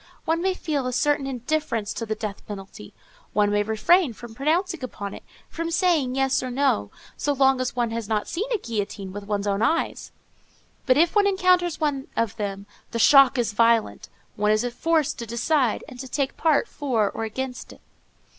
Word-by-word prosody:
One 330 Hz, +1 st, +1 dB
may 375 Hz, 0 st, +1 dB
feel 290 Hz, -8 st, -2 dB
a 255 Hz, -, -3 dB
certain 290 Hz, +1 st, +1 dB
indifference 250 Hz, -4 st, -2 dB
to 230 Hz, -, -5 dB
the 215 Hz, -, -1 dB
death 210 Hz, -2 st, -6 dB
penalty, 195 Hz, -2 st, -9 dB, 0.4 s
one 205 Hz, -1 st, +2 dB
may 205 Hz, 0 st, +2 dB
refrain 235 Hz, -, +3 dB
from 230 Hz, +1 st, -11 dB
pronouncing 325 Hz, -, 0 dB
upon 200 Hz, -5 st, -6 dB
it, -, -, -9 dB, 0.3 s
from 330 Hz, 0 st, -4 dB
saying 335 Hz, -7 st, +1 dB
yes 270 Hz, 0 st, +1 dB
or 255 Hz, -, -4 dB
no, 245 Hz, -, +1 dB, 0.3 s
so 290 Hz, -, 0 dB
long 265 Hz, -1 st, +3 dB
as 255 Hz, -, -2 dB
one 240 Hz, -2 st, 0 dB
has 230 Hz, -2 st, -4 dB
not 215 Hz, -1 st, 0 dB
seen 435 Hz, +8 st, -3 dB
a 465 Hz, -, +2 dB
guillotine 205 Hz, -, -4 dB
with 205 Hz, 0 st, -7 dB
one's 205 Hz, -1 st, -2 dB
own 200 Hz, 0 st, 0 dB
eyes: 320 Hz, +9 st, 0 dB, 0.8 s
but 255 Hz, -, +5 dB
if 335 Hz, +5 st, +3 dB
one 410 Hz, -1 st, +5 dB
encounters 365 Hz, -3 st, +2 dB
one 285 Hz, -3 st, -1 dB
of 230 Hz, -3 st, 0 dB
them, 200 Hz, -2 st, -4 dB, 0.2 s
the -, -, -4 dB
shock 270 Hz, +2 st, +6 dB
is 230 Hz, -3 st, 0 dB
violent; 230 Hz, 0 st, +2 dB, 0.3 s
one 210 Hz, 0 st, +1 dB
is 215 Hz, +3 st, +2 dB
forced 320 Hz, +2 st, 0 dB
to 235 Hz, -, -5 dB
decide, 240 Hz, +2 st, +1 dB
and 250 Hz, -4 st, -11 dB
to 265 Hz, -, -6 dB
take 275 Hz, +1 st, -2 dB
part 310 Hz, -3 st, +2 dB
for 235 Hz, -8 st, -1 dB
or -, -, -4 dB
against. 250 Hz, +3 st, -5 dB
255 Hz, 190 wpm, -24 LUFS, 215-310 Hz, 0.8 s, shock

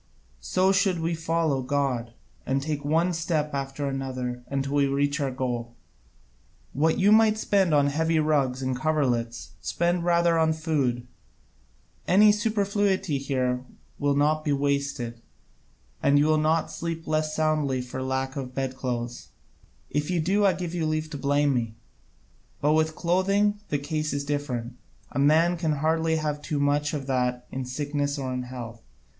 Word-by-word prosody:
So 185 Hz, -, +2 dB
should 195 Hz, -2 st, +2 dB
we 165 Hz, +1 st, -1 dB
follow 165 Hz, -4 st, 0 dB
God, 125 Hz, -3 st, -1 dB, 0.3 s
and 135 Hz, +1 st, 0 dB
take 145 Hz, 0 st, -3 dB
one 165 Hz, +5 st, +2 dB
step 160 Hz, -3 st, -1 dB
after 140 Hz, +1 st, -3 dB
another 130 Hz, -2 st, -4 dB
until 135 Hz, 0 st, -2 dB
we 140 Hz, -1 st, +3 dB
reach 140 Hz, +2 st, 0 dB
our 140 Hz, -2 st, 0 dB
goal. 120 Hz, -2 st, -3 dB, 1.0 s
What 160 Hz, +3 st, +2 dB
you 200 Hz, +2 st, +4 dB
might 215 Hz, 0 st, +5 dB
spend 195 Hz, -5 st, +2 dB
on 145 Hz, -2 st, +4 dB
heavy 160 Hz, +3 st, +1 dB
rugs 140 Hz, -4 st, +1 dB
and 130 Hz, 0 st, -1 dB
coverlets 125 Hz, -5 st, -1 dB
spend 175 Hz, 0 st, 0 dB
rather 170 Hz, -1 st, +3 dB
on 160 Hz, 0 st, +3 dB
food: 140 Hz, -7 st, -1 dB, 1.0 s
any 210 Hz, +3 st, +6 dB
superfluity 200 Hz, -, 0 dB
there 125 Hz, -2 st, -1 dB, 0.4 s
will 145 Hz, -1 st, +1 dB
not 155 Hz, +2 st, +2 dB
be 150 Hz, -, 0 dB
wasted: 140 Hz, -4 st, -1 dB, 0.8 s
and 140 Hz, -, +4 dB
you 145 Hz, -, +4 dB
will 155 Hz, 0 st, +3 dB
not 155 Hz, +1 st, +1 dB
sleep 165 Hz, -1 st, -4 dB
less 155 Hz, 0 st, 0 dB
soundly 155 Hz, -4 st, +1 dB
for 125 Hz, +1 st, -5 dB
lack 130 Hz, 0 st, -2 dB
of 130 Hz, -2 st, -6 dB
bedclothes; 125 Hz, -3 st, -3 dB, 0.6 s
if 150 Hz, +2 st, -1 dB
you 180 Hz, -2 st, +1 dB
do, 195 Hz, +6 st, +2 dB
I 190 Hz, -, +4 dB
give 175 Hz, -2 st, -5 dB
you 165 Hz, -3 st, -1 dB
leave 155 Hz, 0 st, -2 dB
to 145 Hz, -, -4 dB
blame 145 Hz, +1 st, +2 dB
me. 115 Hz, -3 st, -2 dB, 0.8 s
But 150 Hz, +2 st, +2 dB
with 155 Hz, 0 st, +1 dB
clothing 195 Hz, +4 st, +1 dB
the 145 Hz, -, +1 dB
case 155 Hz, +2 st, -2 dB
is 140 Hz, 0 st, -2 dB
different: 130 Hz, -5 st, -3 dB, 0.3 s
a -, -, -3 dB
man 160 Hz, +5 st, +4 dB
can 160 Hz, -2 st, 0 dB
hardly 160 Hz, +2 st, +1 dB
have 150 Hz, -2 st, -2 dB
too 145 Hz, 0 st, -2 dB
much 145 Hz, +1 st, +1 dB
of 140 Hz, -2 st, -4 dB
that 125 Hz, -2 st, -1 dB
in 130 Hz, -1 st, -4 dB
sickness 145 Hz, +2 st, -2 dB
or 130 Hz, -2 st, -3 dB
in 125 Hz, -, -2 dB
health. 120 Hz, -2 st, -8 dB
145 Hz, 160 wpm, -26 LUFS, 130-160 Hz, 1.0 s, any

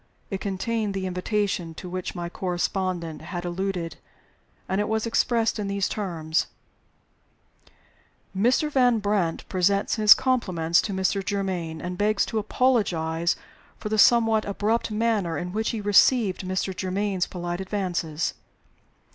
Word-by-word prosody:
It 195 Hz, -, -3 dB
contained 205 Hz, +1 st, -2 dB
the 190 Hz, -1 st, -2 dB
"invitation" 180 Hz, -2 st, -1 dB
to 180 Hz, -, -8 dB
which 185 Hz, +1 st, -5 dB
my 175 Hz, -1 st, -3 dB
correspondent 175 Hz, -2 st, -2 dB
had 175 Hz, +2 st, -5 dB
alluded, 175 Hz, -2 st, -3 dB, 0.7 s
and 190 Hz, +2 st, 0 dB
it 210 Hz, -, -2 dB
was 220 Hz, 0 st, 0 dB
expressed 230 Hz, -1 st, +1 dB
in 205 Hz, -, -2 dB
these 200 Hz, 0 st, 0 dB
terms: 165 Hz, -6 st, -1 dB, 1.9 s
"Mr. 250 Hz, +9 st, +2 dB
Van 250 Hz, -4 st, +4 dB
Brandt 200 Hz, -5 st, -1 dB
presents 200 Hz, +4 st, +1 dB
his 215 Hz, -1 st, +8 dB
compliments 185 Hz, -10 st, +1 dB
to 210 Hz, -, -4 dB
Mr. 190 Hz, +1 st, 0 dB
Germaine, 185 Hz, -5 st, -2 dB
and 180 Hz, 0 st, -5 dB
begs 210 Hz, 0 st, +2 dB
to 220 Hz, -, -2 dB
apologize 175 Hz, -8 st, +1 dB, 0.4 s
for 215 Hz, -, -5 dB
the 215 Hz, 0 st, 0 dB
somewhat 225 Hz, -1 st, +5 dB
abrupt 210 Hz, +4 st, 0 dB
manner 210 Hz, -6 st, 0 dB
in 180 Hz, 0 st, -4 dB
which 220 Hz, +3 st, -1 dB
he 225 Hz, -, -2 dB
received 205 Hz, 0 st, +4 dB
Mr. 185 Hz, 0 st, -2 dB
Germaine's 190 Hz, 0 st, -1 dB
polite 175 Hz, 0 st, -4 dB
advances. 180 Hz, -5 st, -2 dB
195 Hz, 135 wpm, -25 LUFS, 175-215 Hz, 1.9 s, his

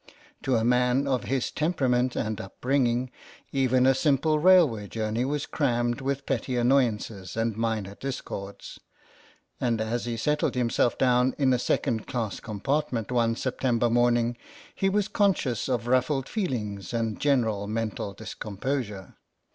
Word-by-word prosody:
To 130 Hz, -2 st, +1 dB
a 110 Hz, -, +1 dB
man 125 Hz, +2 st, +3 dB
of 130 Hz, -5 st, 0 dB
his 130 Hz, +3 st, -1 dB
temperament 130 Hz, -6 st, +1 dB
and 110 Hz, -1 st, -2 dB
upbringing 125 Hz, +3 st, 0 dB, 0.4 s
even 130 Hz, -2 st, +2 dB
a 135 Hz, -, +6 dB
simple 150 Hz, +3 st, +2 dB
railway 155 Hz, -, +5 dB
journey 110 Hz, +2 st, -2 dB
was 145 Hz, +1 st, -2 dB
crammed 120 Hz, -3 st, 0 dB
with 140 Hz, +1 st, -2 dB
petty 130 Hz, -1 st, -1 dB
annoyances 115 Hz, -6 st, +1 dB
and 115 Hz, -1 st, 0 dB
minor 110 Hz, -3 st, -2 dB
discords, 100 Hz, -5 st, -6 dB, 0.8 s
and 120 Hz, -3 st, 0 dB
as 115 Hz, +2 st, -2 dB
he 120 Hz, -1 st, -3 dB
settled 150 Hz, +4 st, 0 dB
himself 120 Hz, -1 st, +1 dB
down 125 Hz, 0 st, +3 dB
in 135 Hz, -3 st, +3 dB
a 125 Hz, -, +1 dB
second 120 Hz, -2 st, 0 dB
class 115 Hz, -5 st, -3 dB
compartment 120 Hz, +2 st, -2 dB
one 115 Hz, -2 st, +2 dB
September 120 Hz, -2 st, 0 dB
morning 120 Hz, 0 st, +2 dB, 0.4 s
he 195 Hz, -, +1 dB
was 205 Hz, +1 st, +1 dB
conscious 180 Hz, -, +1 dB
of 120 Hz, -3 st, 0 dB
rufHed 130 Hz, +2 st, +1 dB
feelings 115 Hz, -, -3 dB
and 115 Hz, -2 st, -1 dB
general 110 Hz, -8 st, +1 dB
mental 110 Hz, -2 st, -3 dB
discomposure. 105 Hz, 0 st, -5 dB
125 Hz, 140 wpm, -27 LUFS, 115-135 Hz, 0.8 s, a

